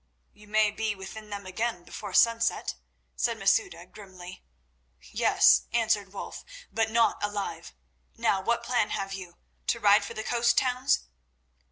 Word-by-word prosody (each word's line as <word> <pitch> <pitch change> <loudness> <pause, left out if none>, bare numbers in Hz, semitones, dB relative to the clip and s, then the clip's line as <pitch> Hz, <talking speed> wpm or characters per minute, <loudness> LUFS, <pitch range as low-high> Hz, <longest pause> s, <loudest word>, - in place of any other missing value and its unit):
"You 210 0 -18
may 215 0 +3
be 215 0 -2
within 210 +3 -9
them 200 -1 -6
again 185 0 -3
before 200 +1 -7
sunset," 230 0 +3 0.4
said - - 0
Masouda - - +1
grimly. 185 -3 -12 0.7
"Yes," - - +4
answered 220 -4 +1
Wulf, 200 - -7 0.3
"but 225 0 0
not 230 -1 +2
alive. 205 - -4 0.4
Now 195 - +1
what 235 +4 0
plan 240 -3 +1
have 195 0 -3
you? 185 -3 -8 0.3
To 235 - +1
ride 205 -1 +5
for - - -7
the 220 - -4
coast 240 +1 +2
towns?" 255 +1 +2
210 Hz, 145 wpm, -28 LUFS, 195-230 Hz, 0.7 s, ride